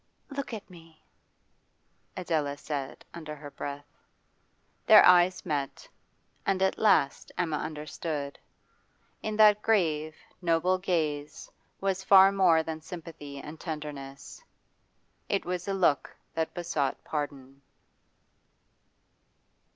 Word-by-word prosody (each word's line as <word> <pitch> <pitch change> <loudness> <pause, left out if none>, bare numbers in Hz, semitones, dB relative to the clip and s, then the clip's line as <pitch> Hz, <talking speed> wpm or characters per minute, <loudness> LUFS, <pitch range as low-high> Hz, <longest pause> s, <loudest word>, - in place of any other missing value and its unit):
'Look 280 -2 -4
at 220 -3 -7
me,' 165 -3 -17 1.1
Adela 155 -6 -1
said, 140 -2 -5
under 155 -3 -7
her 145 -1 -10
breath. 140 0 -6 1.0
Their - - +9
eyes 180 0 +5
met, 145 -5 -3 0.6
and 195 -1 +1
at 190 - +1
last 195 -10 +2
Emma 160 -4 0
understood. 150 -1 -5 0.8
In 215 -1 -3
that 210 -1 +6
grave, 155 -8 +1 0.3
noble 175 +2 +2
gaze 155 -5 -2 0.3
was 190 -1 -1
far 195 0 +7
more 180 -5 +4
than 160 0 -5
sympathy 155 -4 -9
and 150 +2 -9
tenderness; 150 - -7 0.9
it 200 - 0
was 180 0 -3
a 195 - 0
look 170 -7 +1 0.2
that 160 0 -2
besought 160 -6 -2
pardon. 140 -2 -5
160 Hz, 105 wpm, -28 LUFS, 145-185 Hz, 1.1 s, Their